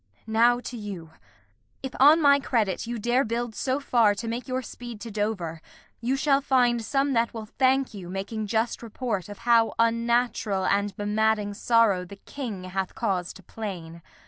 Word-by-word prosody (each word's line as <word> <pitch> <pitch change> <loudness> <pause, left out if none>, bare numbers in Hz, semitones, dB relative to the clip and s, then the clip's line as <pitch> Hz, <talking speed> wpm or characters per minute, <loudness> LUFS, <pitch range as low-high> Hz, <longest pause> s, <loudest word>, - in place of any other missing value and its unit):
Now 235 +2 +3
to 245 - -7
you: 195 -7 -7 0.7
If 265 - -5
on 295 +5 +7
my 280 0 +6
credit 225 -8 -1
you 240 0 -3
dare 240 +4 +2
build 235 0 -3
so 260 +4 -1
far 235 -7 +3
To 230 +3 -5
make 235 +3 -4
your 255 0 -2
speed 240 -2 -9
to 230 - -7
Dover, 200 -6 -3 0.4
you 245 +3 0
shall 275 0 +2
find 245 -4 +2
Some 275 +4 0
that 235 0 +1
will 220 -1 -5
thank 260 +3 +1
you, 185 -4 -8
making 205 +3 -4
just 225 +2 -1
report 225 -4 -4
Of 205 - -8
how 230 -1 +4
unnatural 230 -3 +1
and 200 0 0
bemadding 210 0 +1
sorrow 220 -4 +3
The 180 +3 -10
King 215 -2 -7
hath 185 +1 -4
cause 180 -2 -1
to 190 - -15
plain. 170 -5 -7
225 Hz, 170 wpm, -26 LUFS, 200-245 Hz, 0.7 s, on